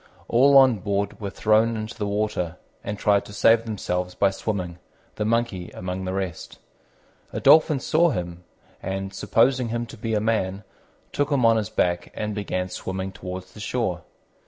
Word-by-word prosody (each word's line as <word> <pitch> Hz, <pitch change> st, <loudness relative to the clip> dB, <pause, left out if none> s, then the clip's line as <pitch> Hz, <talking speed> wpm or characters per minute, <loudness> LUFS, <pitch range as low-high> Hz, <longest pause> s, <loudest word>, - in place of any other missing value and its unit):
All 135 Hz, +4 st, +5 dB
on 130 Hz, -5 st, +6 dB
board 100 Hz, +2 st, -2 dB
were 100 Hz, -, -3 dB
thrown 110 Hz, +3 st, +2 dB
into 110 Hz, +1 st, -5 dB
the 105 Hz, -3 st, -3 dB
water, 100 Hz, -5 st, -2 dB, 0.3 s
and 105 Hz, -, -4 dB
tried 100 Hz, -1 st, +2 dB
to 105 Hz, -, -11 dB
save 115 Hz, +2 st, +4 dB
themselves 90 Hz, -4 st, -3 dB
by 100 Hz, -1 st, +3 dB
swimming, 90 Hz, -4 st, -4 dB, 0.4 s
the 105 Hz, -, -1 dB
Monkey 110 Hz, -6 st, -1 dB
among 90 Hz, +1 st, -4 dB
the 95 Hz, -, -3 dB
rest. 95 Hz, -3 st, -4 dB, 0.7 s
A -, -, -3 dB
Dolphin 155 Hz, -2 st, +5 dB
saw 170 Hz, +6 st, +3 dB
him, 90 Hz, -, -4 dB, 0.4 s
and, 95 Hz, 0 st, -4 dB
supposing 125 Hz, +4 st, +2 dB
him 120 Hz, +1 st, -2 dB
to 120 Hz, -, -12 dB
be 110 Hz, 0 st, -2 dB
a -, -, +2 dB
man, 105 Hz, -3 st, -1 dB, 0.5 s
took 145 Hz, +1 st, -1 dB
him 135 Hz, -4 st, +3 dB
on 115 Hz, 0 st, +5 dB
his 105 Hz, -3 st, -2 dB
back 90 Hz, -1 st, 0 dB
and 105 Hz, 0 st, -3 dB
began 95 Hz, -3 st, -2 dB
swimming 95 Hz, +1 st, -4 dB
towards 90 Hz, -1 st, -8 dB
the -, -, -12 dB
shore. 105 Hz, -5 st, -2 dB
105 Hz, 175 wpm, -24 LUFS, 95-115 Hz, 0.7 s, on